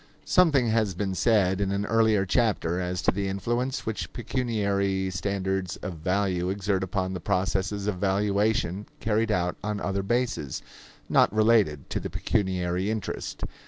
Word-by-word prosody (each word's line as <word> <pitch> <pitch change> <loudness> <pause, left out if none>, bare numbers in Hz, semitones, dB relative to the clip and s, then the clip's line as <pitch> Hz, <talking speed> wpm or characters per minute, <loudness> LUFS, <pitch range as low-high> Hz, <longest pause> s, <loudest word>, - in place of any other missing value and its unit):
Something 145 -10 +4
has 110 -4 +1
been 95 0 -2
said 95 -2 +2
in 100 -1 0
an 100 +1 -1
earlier 110 -3 +3
chapter 95 -5 +1
as 90 0 -3
to - - +4
the 100 +1 -2
influence 120 +7 -2
which 110 -1 -3
pecuniary 100 -6 -1
standards 95 -1 -2
of 90 -2 -4
value 90 +1 0
exert 95 0 0
upon 95 0 -2
the 90 - -3
processes 95 +3 -1
of 105 -3 -1
valuation 100 0 0
carried 110 0 +1
out 90 -3 0
on 105 -1 -2
other 95 +1 -1
bases, 115 - -1 0.4
not - - +4
related 110 - +3
to - - 0
the - - -5
pecuniary 95 -1 -1
interest. 110 -3 -4
100 Hz, 150 wpm, -27 LUFS, 95-110 Hz, 0.4 s, Something